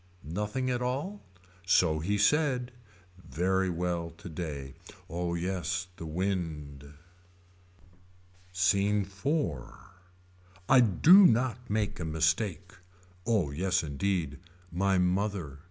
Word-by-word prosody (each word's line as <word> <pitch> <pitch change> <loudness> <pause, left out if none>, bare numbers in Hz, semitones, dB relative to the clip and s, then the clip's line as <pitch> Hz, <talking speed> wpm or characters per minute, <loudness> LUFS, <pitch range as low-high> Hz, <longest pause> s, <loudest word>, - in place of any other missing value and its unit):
Nothing 105 - -2
at 125 0 -1
all. 140 +12 -3 0.4
So 90 -3 +3
he 100 +6 -1
said. 125 +2 +2 0.5
Very 95 +3 0
well 85 -1 -2
today. 75 -6 -6 0.3
Oh 85 +1 -3
yes 90 +1 -2
the 80 - -7
wind. 75 -5 -4 1.6
SCENE 100 +3 +2
IV. 100 - -2 1.0
I 130 - +6
do 165 - +7
not 125 +1 0
make 105 -2 -1
a 80 - -3
mistake. 80 +4 -1 0.5
Oh 100 -11 +1
yes 95 +4 0
indeed. 80 0 -2 0.3
My 95 +3 +1
mother. 90 -5 -1
95 Hz, 100 wpm, -29 LUFS, 80-105 Hz, 1.6 s, do